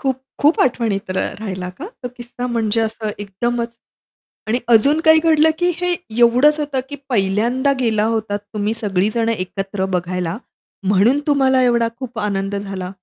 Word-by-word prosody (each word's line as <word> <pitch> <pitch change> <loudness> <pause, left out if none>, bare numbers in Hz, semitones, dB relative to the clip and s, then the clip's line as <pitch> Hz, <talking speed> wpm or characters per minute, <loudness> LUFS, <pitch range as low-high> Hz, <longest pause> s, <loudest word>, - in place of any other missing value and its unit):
खूप 265 -2 -1 0.2
खूप 295 +3 +4
आठवणीत 225 -7 0
र 185 - -1 0.2
राहिला 185 -4 -4
का 340 - -6 0.2
तो 250 - -3
किस्सा? 245 +1 -6
म्हणजे 225 -2 0
असं 220 -1 -2
एकदमच. 235 +4 -2 0.8
आणि 230 +3 +1
अजून 275 +7 +5
काही 315 0 +7
घडलं 320 -1 +5
की 355 0 +2
हे 360 +1 0 0.3
एवढंच 250 +6 +5
होतं 285 -3 -1
की 285 - -6
पहिल्यांदा 235 +5 +1
गेला 220 -4 +1
होतात 210 -2 -2 0.2
तुम्ही 210 +1 -1
सगळी 205 -4 0
जण 230 -1 +1
एकत्र 195 -1 -2
बघायला, 180 0 -3 0.5
म्हणून 205 +8 +4
तुम्हाला 265 -3 +3
एवढा 235 -2 +3
खूप 250 -3 -7
आनंद 200 -1 -2
झाला? 195 -2 -5
230 Hz, 155 wpm, -19 LUFS, 200-260 Hz, 0.8 s, काही